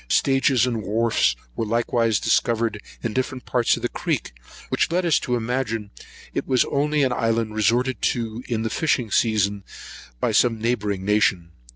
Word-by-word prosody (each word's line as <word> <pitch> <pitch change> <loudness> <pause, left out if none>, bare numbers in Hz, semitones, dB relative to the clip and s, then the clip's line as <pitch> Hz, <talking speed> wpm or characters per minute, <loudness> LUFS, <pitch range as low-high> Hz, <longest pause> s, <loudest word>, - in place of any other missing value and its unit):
Stages 135 - +3
and 120 -3 -2
wharfs 105 - +1 0.2
were - - -2
likewise 115 -1 +1
discovered 115 -3 +1 0.2
in 115 - -2
different 130 +1 -3
parts 120 -2 +2
of - - -9
the - - +2
creek, - - -2 0.4
which - - 0
led 180 +1 +1
us 165 - +3
to 125 - -1
imagine 115 -3 -2 0.4
it - - -3
was 130 -2 +3
only 150 +1 +1
an 130 -2 +1
island 115 -2 0
resorted 120 +4 +1
to 115 0 -1
in 115 -2 -1
the 110 - -2
fishing 125 -8 0
season 105 -3 +1 0.6
by - - +1
some 115 -2 +3
neighbouring 105 -4 -1
nation. 95 -5 +1
115 Hz, 165 wpm, -23 LUFS, 110-125 Hz, 0.6 s, Stages